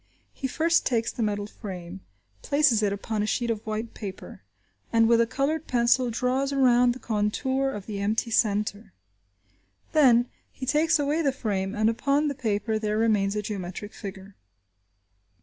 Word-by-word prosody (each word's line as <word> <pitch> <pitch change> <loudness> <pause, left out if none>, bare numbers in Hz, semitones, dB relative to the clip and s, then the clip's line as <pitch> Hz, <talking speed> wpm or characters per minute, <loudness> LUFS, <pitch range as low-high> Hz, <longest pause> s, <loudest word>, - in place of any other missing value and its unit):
He 265 - -3
first 335 +5 +2
takes 230 -2 0
the - - -5
metal 205 -2 -1
frame, 190 -4 -8 0.4
places 285 -6 +3
it 205 -2 +1
upon 210 +2 -3
a 210 - -1
sheet 235 +1 0
of 220 -2 -4
white 220 +1 -3
paper, 195 -3 -8 0.5
and 225 -1 +4
with 235 0 +5
a 230 - +2
coloured 295 +5 -1
pencil 240 +1 +2
draws 255 +4 0
around 250 -3 +4
the 255 - -10
contour 260 +6 0
of 210 -7 -6
the 205 -2 -5
empty 215 +3 -1
centre. 210 -1 0 1.0
Then, 245 -6 +5 0.3
he 260 - -7
takes 320 +5 +3
away 295 +2 0
the 280 -4 +2
frame, 205 -6 -2
and 215 0 +2
upon 280 +6 +1
the - - -2
paper 220 -3 -1
there 215 0 -1
remains 210 -3 +2
a 210 - -2
geometric 200 0 -6
figure. 195 -1 -9
230 Hz, 165 wpm, -26 LUFS, 210-260 Hz, 1.0 s, with